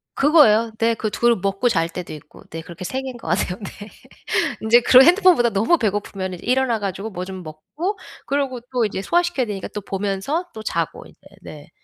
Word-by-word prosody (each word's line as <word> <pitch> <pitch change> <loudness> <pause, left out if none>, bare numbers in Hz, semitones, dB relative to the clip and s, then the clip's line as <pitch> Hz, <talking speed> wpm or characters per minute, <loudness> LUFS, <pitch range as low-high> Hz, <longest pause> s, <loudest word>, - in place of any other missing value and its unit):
그거예요. 230 -7 +4
네. 230 0 +2
그 220 -1 -3
2 235 +2 +2
먹고 195 +5 0
잘 165 -8 +1
때도 175 +1 -7
있고 150 0 -14
네. 165 - -6
그렇게 170 +2 -10
3 260 +8 -3
개인 260 -2 -7
것 230 - -10
같네요 180 +2 -1
네. 205 +2 -9 0.7
인제 230 +2 +5
그런 255 +2 +7
핸드폰 365 +1 +6
보다 240 -3 +2
너무 220 - +2
배고프면은 195 - -3
일어나 255 -3 +1
가지고 200 +1 -4
뭐 180 -1 -5
좀 190 -1 -8
먹고 295 - -5 0.3
그러고 275 -3 -1
또 245 -3 +1
이제 195 -2 -3
소화시켜야 345 - +1
되니까 205 -3 -5
또 210 - -6
보면서 200 - -2
또 220 - -8
자고 - - -3
이제. - - -18 0.2
네. - - -12
220 Hz, 375 characters per minute, -21 LUFS, 190-260 Hz, 0.7 s, 그런